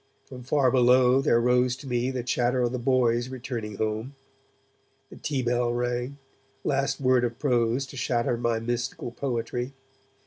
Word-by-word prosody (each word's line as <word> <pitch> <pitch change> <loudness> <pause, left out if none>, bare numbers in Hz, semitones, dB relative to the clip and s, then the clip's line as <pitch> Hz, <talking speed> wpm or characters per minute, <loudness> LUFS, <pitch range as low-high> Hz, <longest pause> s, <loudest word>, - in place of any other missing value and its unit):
From 130 -2 -10
far 130 0 +2
below 125 +1 +5
there 120 -3 +3
rose 125 +1 +2
to 135 - -12
me 125 0 0
the 130 -2 -3
chatter 125 +1 +1
of 120 - 0
the 125 - -3
boys 120 -1 +2
returning 120 -5 -5
home. 110 +6 -3 1.0
The - - -10
tea 140 -3 -2
bell 120 0 +1
rang, 120 +2 -2 0.5
last 135 0 0
word 130 -2 +3
of 120 -1 -2
prose 125 -1 +1
to 135 - -11
shatter 120 -1 0
my 120 -1 0
mystical 120 +1 -3
poetry. 125 0 -3
125 Hz, 160 wpm, -26 LUFS, 120-130 Hz, 1.0 s, below